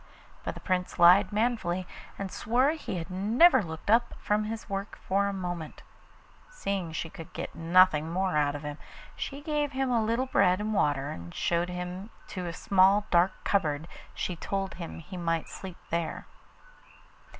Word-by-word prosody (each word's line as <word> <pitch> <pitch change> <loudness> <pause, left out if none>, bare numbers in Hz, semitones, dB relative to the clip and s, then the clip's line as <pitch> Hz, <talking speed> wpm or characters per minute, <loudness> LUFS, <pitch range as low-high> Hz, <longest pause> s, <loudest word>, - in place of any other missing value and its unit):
But - - -4
the - - -8
Prince 180 -1 -1
lied 180 +5 +7
manfully, 210 -5 0 0.3
and 195 -1 -4
swore 250 +6 +2
he 315 -10 -5
had 170 +2 -6
never 230 - +5
looked 160 +2 -4
up 235 +1 +3
from 210 +1 0
his 225 +1 -5
work 200 0 -4
for 200 +1 +2
a - - -1
moment. 175 -5 -5 0.7
Seeing 195 - -3
she 160 - -3
could 165 -3 -10
get - - -5
nothing 165 -2 +4
more 185 -1 0
out 145 -1 +2
of 145 - -6
him, 150 0 -6 0.4
she 280 0 -5
gave 295 -2 -1
him 265 -1 0
a 230 -2 +2
little 230 +4 +1
bread 185 -7 +3
and 215 +1 -2
water, 145 -7 +1
and 85 0 -8
showing 170 0 +1
him 180 +3 -5 0.2
to 180 -3 -4
a - - -3
small 195 +3 +4
dark 180 +2 +4
cupboard 160 -5 0 0.3
she 180 - -2
told 195 +3 -3
him 170 -3 -7
he 180 +3 -9
might 165 -2 -1
sleep 185 -3 -8
there. 170 -1 -2
185 Hz, 175 wpm, -29 LUFS, 170-215 Hz, 0.7 s, lied